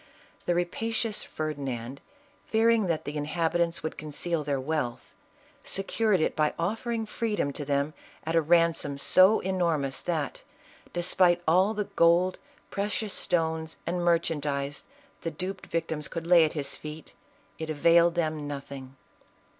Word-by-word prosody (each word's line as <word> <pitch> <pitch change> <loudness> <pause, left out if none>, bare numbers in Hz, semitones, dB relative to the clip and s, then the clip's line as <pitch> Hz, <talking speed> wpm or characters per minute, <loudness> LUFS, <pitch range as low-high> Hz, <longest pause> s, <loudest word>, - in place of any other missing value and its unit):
The 175 - +2
rapacious 220 +5 -1
Ferdi 155 -2 -4
nand, 130 0 -4 0.5
fearing 225 -2 +3
that 165 -2 -1
the 145 - -5
inhabitants 165 +3 0
would 160 - -4
conceal 155 +2 -2
their 140 -1 -1
wealth, 135 -3 -2 0.6
secured 195 0 +1
it - - +1
by 155 -1 +1
offering 225 +6 -2
freedom 210 -10 -1
to 145 - -5
them 140 +1 0 0.3
at 165 +1 -2
a 165 - +5
ransom 165 -3 +2
so 185 +8 +5
enormous, 170 -8 0
that 160 -5 -2 0.5
despite 175 0 +3
all 185 +6 +4
the 210 - 0
gold, 175 0 +3 0.3
precious 205 +1 -1
stones, 160 -1 -1
and 175 +1 -1
merchandise 150 -4 0 0.4
the 165 - -2
duped 185 +4 -5
victims 160 -3 -2
could 165 -1 -5
lay 170 -2 +7
at 155 - -3
his 145 -3 -4
feet, 155 +1 -9 0.5
it 160 0 -4
availed 170 +3 +4
them 155 -3 -1
nothing. 135 -2 -7
165 Hz, 140 wpm, -28 LUFS, 150-180 Hz, 0.6 s, lay